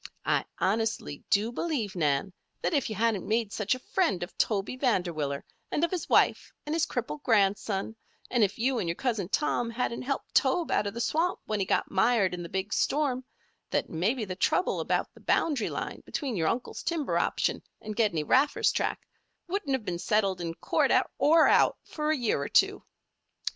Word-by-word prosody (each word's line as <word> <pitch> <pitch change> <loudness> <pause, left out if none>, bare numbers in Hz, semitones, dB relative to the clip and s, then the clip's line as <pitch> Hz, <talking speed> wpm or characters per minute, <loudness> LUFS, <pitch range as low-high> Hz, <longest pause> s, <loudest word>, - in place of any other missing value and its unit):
"I - - +1
honestly 215 -7 -1
do 210 +3 +2
believe, 245 - -2
Nan, 150 +2 0 0.3
that - - 0
if 280 -5 +1
you 215 - -4
hadn't 220 -2 0
made 220 -1 0
such 210 +4 0
a 255 - -12
friend 330 - +2
of 175 - -8
Toby 205 +2 0
Vanderwiller 175 - -1 0.3
and 300 - 0
of 340 - +2
his 365 -3 -3
wife - - +3
and 300 - -3
his 325 -1 +1
crippled 245 +4 -4
grandson, 205 -2 +1 0.4
and 240 -3 +3
if 200 0 0
you 250 +1 +1
and 170 - -1
your 170 - -1
Cousin 220 -7 -1
Tom 240 -3 0
hadn't 235 0 -2
helped 275 +2 -4
Tobe 330 +5 +2
out 205 - +2
of 200 - -5
the 235 - -2
swamp 330 +8 +1
when 215 -1 -2
he 190 - -1
got - - 0
mired 195 -1 +3
in 175 - -4
the 170 - -7
big 190 +3 -3
storm, 275 -4 +1 0.5
that - - -1
maybe 215 +9 0
the 185 -2 -5
trouble 360 - +1
about - - -1
the - - -17
boundary 285 -9 +1
line - - -5
between 270 -6 -3
your 160 -4 0
uncle's 240 +7 -2
timber 330 -4 0
option - - 0 0.2
and 215 0 -6
Gedney 205 -9 +1
Raffer's 270 - +3
tract, - - -2 0.4
wouldn't 350 -6 -2
have 260 -5 -1
been 175 -3 -3
settled, 195 -2 +1
in 165 -1 -4
court 165 - +1 0.3
or 320 +2 +6
out, - - +4
for 300 -1 -3
a 310 - +2
year 230 - 0
or 140 - -3
two. - - +3
225 Hz, 195 wpm, -28 LUFS, 190-270 Hz, 0.5 s, or